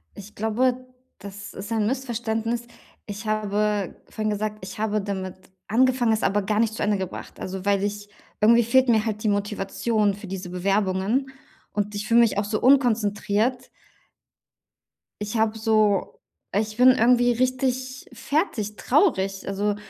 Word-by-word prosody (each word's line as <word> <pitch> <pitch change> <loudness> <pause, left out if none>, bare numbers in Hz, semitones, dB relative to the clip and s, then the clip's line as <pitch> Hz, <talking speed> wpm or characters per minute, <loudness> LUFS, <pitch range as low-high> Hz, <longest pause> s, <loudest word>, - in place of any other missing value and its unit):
Ich 205 +1 -11
glaube, 250 +4 0 0.3
das 200 0 -9
ist 205 +4 -8
ein 215 -2 +1
Missverständnis. 235 -2 -2 0.4
Ich 205 +1 -7
habe 210 -2 0
vorhin 215 -1 -2
gesagt, 215 +1 -3
ich 190 0 -8
habe 215 -1 0
damit 190 -2 -4 0.3
angefangen, 250 0 +3
es 220 - 0
aber 205 +2 +2
gar 210 +2 0
nicht 225 -1 +2
zu - - -3
Ende 205 -1 +1
gebracht. 190 -1 -7
Also, 190 0 -6
weil 200 -1 +2
ich 205 0 -4 0.3
irgendwie 235 +2 +6
fehlt 260 +3 +3
mir 220 -1 +3
halt 215 0 -3
die 215 - +2
Motivation 205 +1 0
für 200 +1 -10
diese 185 -1 -6
Bewerbungen, 195 +7 0 0.4
und 205 0 -2
ich 205 +1 -3
fühle 235 0 +4
mich 230 -4 +3
auch 205 - +2
so 210 +1 -2
unkonzentriert. 240 -1 +2 1.5
Ich 210 +2 -3
habe 220 0 +1
so 215 -3 +1 0.3
ich 215 +2 -1
bin 250 +1 +7
irgendwie 245 0 +4
richtig 255 +1 -1
fertig, 240 - -2
traurig, 195 - +1
also 205 +1 -1
215 Hz, 150 wpm, -24 LUFS, 205-235 Hz, 1.5 s, bin